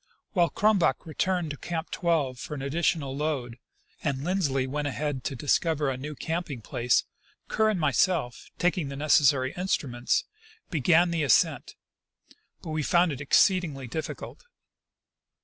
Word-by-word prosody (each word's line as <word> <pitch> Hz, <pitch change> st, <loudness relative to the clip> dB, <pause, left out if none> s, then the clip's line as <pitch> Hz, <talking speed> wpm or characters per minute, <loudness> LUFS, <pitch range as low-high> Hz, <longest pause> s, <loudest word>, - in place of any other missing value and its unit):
While 175 Hz, -3 st, +3 dB
Crumback 200 Hz, -7 st, +2 dB
returned 170 Hz, +1 st, -1 dB
to 145 Hz, -, -6 dB
Camp 165 Hz, +2 st, -5 dB
12 150 Hz, -8 st, 0 dB
for 150 Hz, -, -6 dB
an 135 Hz, -, -6 dB
additional 145 Hz, -1 st, 0 dB
load 135 Hz, -5 st, -3 dB, 0.4 s
and 140 Hz, -3 st, -1 dB
Lindsley 150 Hz, -7 st, 0 dB
went 145 Hz, +2 st, -2 dB
ahead 145 Hz, -2 st, -3 dB
to 135 Hz, -, -2 dB
discover 150 Hz, +1 st, +1 dB
a -, -, -3 dB
new 150 Hz, +3 st, -6 dB
canaping 160 Hz, -6 st, -4 dB
place, 120 Hz, +3 st, +1 dB, 0.5 s
Kerr 220 Hz, 0 st, +2 dB
and 210 Hz, -4 st, 0 dB
myself, 150 Hz, -2 st, +1 dB
taking 175 Hz, -4 st, 0 dB
the 140 Hz, -, -6 dB
neces 150 Hz, +1 st, +4 dB
sary 130 Hz, -1 st, -1 dB
instruments, 140 Hz, -9 st, 0 dB, 0.5 s
began 170 Hz, +2 st, +3 dB
the 165 Hz, -1 st, 0 dB
ascent; 140 Hz, -7 st, +2 dB, 0.9 s
but 160 Hz, -, -6 dB
we 155 Hz, 0 st, -1 dB
found 170 Hz, +3 st, +3 dB
it 140 Hz, -1 st, -5 dB
exceedingly 150 Hz, -2 st, +2 dB
difficult. 155 Hz, +6 st, -6 dB
150 Hz, 145 wpm, -27 LUFS, 135-170 Hz, 0.9 s, neces